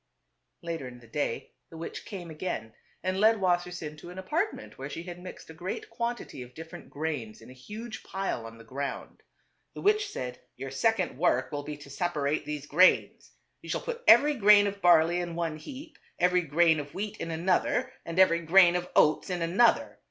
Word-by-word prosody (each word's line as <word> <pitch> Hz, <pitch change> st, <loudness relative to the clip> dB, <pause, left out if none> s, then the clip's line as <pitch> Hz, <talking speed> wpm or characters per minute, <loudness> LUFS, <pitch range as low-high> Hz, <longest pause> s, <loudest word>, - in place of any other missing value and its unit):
Later 165 Hz, -6 st, -4 dB
in 125 Hz, 0 st, -11 dB
the 120 Hz, -, -17 dB
day 115 Hz, 0 st, -3 dB, 0.2 s
the 165 Hz, -, -11 dB
witch 165 Hz, -, -7 dB
came 180 Hz, -6 st, -7 dB
again 155 Hz, -9 st, -4 dB, 0.3 s
and 185 Hz, +1 st, -1 dB
led 220 Hz, +2 st, +5 dB
Wassersein 175 Hz, -4 st, -1 dB
to 175 Hz, -, -10 dB
an 180 Hz, -, -10 dB
apartment 315 Hz, -, -3 dB
where -, -, -5 dB
she 165 Hz, -, -6 dB
had 175 Hz, 0 st, -8 dB
mixed 185 Hz, -, -10 dB
a -, -, -11 dB
great 180 Hz, +7 st, -6 dB
quantity 235 Hz, -, -4 dB
of 125 Hz, 0 st, -11 dB
different 160 Hz, 0 st, -10 dB
"grains 140 Hz, -8 st, -4 dB
in 115 Hz, -, -13 dB
a -, -, -11 dB
huge 215 Hz, -, -8 dB
pile 190 Hz, -12 st, -3 dB
on 115 Hz, 0 st, -12 dB
the 115 Hz, -, -13 dB
ground. 135 Hz, +4 st, -6 dB, 0.5 s
The -, -, -7 dB
witch 420 Hz, 0 st, +3 dB
said, 125 Hz, -1 st, -5 dB
" -, -, -49 dB
Your 135 Hz, +1 st, -6 dB
second 185 Hz, -, 0 dB
work 130 Hz, -7 st, +2 dB
will 145 Hz, -, -3 dB
be 150 Hz, 0 st, -7 dB
to 145 Hz, -1 st, -13 dB
separate 150 Hz, -2 st, -1 dB
these 150 Hz, -1 st, -5 dB
grains. 180 Hz, +6 st, +3 dB, 0.3 s
You -, -, -11 dB
shall -, -, -1 dB
put 480 Hz, -1 st, -5 dB
every 295 Hz, +1 st, +7 dB
grain 210 Hz, -4 st, +6 dB
of 200 Hz, 0 st, -3 dB
barley 175 Hz, 0 st, +5 dB
in 175 Hz, -1 st, -4 dB
one 165 Hz, -2 st, -2 dB
heap, 285 Hz, -, -10 dB, 0.2 s
every 180 Hz, +1 st, +3 dB
grain 160 Hz, 0 st, +3 dB
of 145 Hz, -1 st, -8 dB
wheat 210 Hz, +1 st, -4 dB
in 165 Hz, -, -5 dB
another, 180 Hz, +9 st, 0 dB
and 165 Hz, +1 st, -6 dB
every 185 Hz, -3 st, +5 dB
grain 175 Hz, +1 st, +6 dB
of 180 Hz, 0 st, -2 dB
oats 155 Hz, +4 st, +4 dB
in 180 Hz, -2 st, -1 dB
another. 210 Hz, +8 st, +2 dB
175 Hz, 200 wpm, -28 LUFS, 150-195 Hz, 0.5 s, every